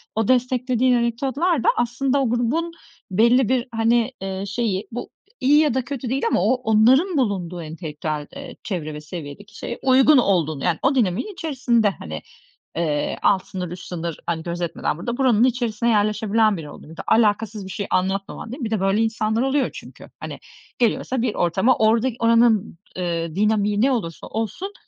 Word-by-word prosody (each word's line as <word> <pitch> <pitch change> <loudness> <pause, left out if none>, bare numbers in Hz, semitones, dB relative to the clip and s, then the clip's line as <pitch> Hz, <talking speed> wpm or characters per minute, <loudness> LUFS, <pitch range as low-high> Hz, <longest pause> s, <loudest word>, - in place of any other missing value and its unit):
o 220 -1 0
desteklediğin 250 0 +2
anekdotlar 265 +6 0
da - - +4
aslında 255 +3 0
o 250 - +1
grubun 250 +9 0 0.4
belli 235 +4 +4
bir, 255 0 +1
hani, 230 +2 +2
eee, 195 0 -4
şeyi 205 -2 -2
bu 240 - -6 0.3
iyi 285 +3 +4
ya 300 -6 +3
da 260 - +1
kötü 265 -4 -5
değil 270 +2 -1
ama - - +2
o 245 - +4
onların 255 - +3
bulunduğu 180 -8 -1
entelektüel, 155 -2 -5
eee, 280 0 -8
çevre 160 -7 -4
ve 150 - -7
seviyedeki 155 +4 -9
şeye 240 - -6
uygun 265 +2 +6
olduğunu 165 - +1
yani 175 -3 +1
o 270 +1 +2
dinamiğin 235 - 0
içerisinde, 255 - +1
hani, 80 -2 -6 0.5
eee, 155 -3 -1
alt 190 -2 +2
sınır, 180 -2 -5
üst 180 0 -8
sınır, 170 -2 -5
hani, 160 -1 -2
gözetmeden 170 -2 -3
burada 235 +8 -4
buranın 245 -4 +3
içerisine 235 -2 +1
yerleşebilen 215 -1 +2
biri 150 -2 -8
oluyor. 155 - -12
Bir 165 - -13
de - - -4
alakasız 215 -1 +2
bir 190 - -8
şey 200 +1 -4
anlatmaman 195 +4 -2
değil 260 +3 -7
mi? - - -2
Bir 220 - -4
de 215 - +1
böyle 195 +3 +2
insanlar 220 0 0
oluyor 270 +1 +1
çünkü - - -12
hani - - -7 0.4
geliyorsa 245 +1 0
bir 235 -3 -1
ortama 190 +9 +2
orada 225 +3 +3
oranın, 230 -4 +3 0.2
eee, 170 -2 -3
dinamiği 210 0 +1
ne 270 +2 +4
olursa 170 -10 -3
olsun 225 - -4
220 Hz, 175 wpm, -22 LUFS, 185-250 Hz, 0.5 s, uygun